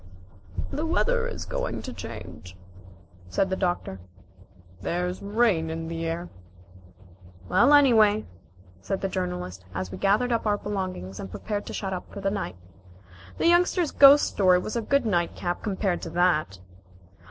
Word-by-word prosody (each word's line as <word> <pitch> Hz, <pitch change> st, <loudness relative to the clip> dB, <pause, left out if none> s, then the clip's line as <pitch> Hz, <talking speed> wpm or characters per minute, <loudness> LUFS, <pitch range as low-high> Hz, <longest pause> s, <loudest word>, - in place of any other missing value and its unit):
"The 300 Hz, -, -3 dB
weather 470 Hz, +9 st, +1 dB
is -, -, -6 dB
going -, -, -3 dB
to 255 Hz, -, -6 dB
change," 95 Hz, -5 st, -9 dB, 0.7 s
said 190 Hz, -, 0 dB
the -, -, +1 dB
Doctor. 175 Hz, -, -2 dB, 0.8 s
"There's 180 Hz, -, -2 dB
rain 200 Hz, -6 st, +1 dB
in 165 Hz, 0 st, -4 dB
the 165 Hz, 0 st, -3 dB
air." 170 Hz, +2 st, -3 dB, 1.2 s
"Well, 235 Hz, -, +4 dB
anyway," 220 Hz, -7 st, +5 dB, 0.6 s
said 190 Hz, -, -3 dB
the 195 Hz, -, 0 dB
Journalist, 180 Hz, -, -4 dB
as 95 Hz, -1 st, -3 dB
we 95 Hz, -, -7 dB
gathered 215 Hz, -, +2 dB
up 230 Hz, -2 st, 0 dB
our 205 Hz, -1 st, +2 dB
belongings 185 Hz, -, -5 dB
and 95 Hz, -, -6 dB
prepared 205 Hz, -, -4 dB
to -, -, -6 dB
shut 190 Hz, -2 st, -3 dB
up 180 Hz, -, -6 dB
for -, -, -7 dB
the 195 Hz, 0 st, -1 dB
night, 200 Hz, -, -4 dB, 0.8 s
"the -, -, -1 dB
Youngster's 345 Hz, -1 st, +3 dB
ghost 280 Hz, +1 st, +8 dB
story 185 Hz, -2 st, +3 dB
was 195 Hz, +5 st, -4 dB
a 235 Hz, -, 0 dB
good 280 Hz, +3 st, +1 dB
night 175 Hz, -5 st, 0 dB
cap 175 Hz, 0 st, -3 dB
compared 195 Hz, -3 st, -1 dB
to -, -, -5 dB
that." 165 Hz, -, +1 dB
190 Hz, 155 wpm, -26 LUFS, 165-230 Hz, 1.2 s, ghost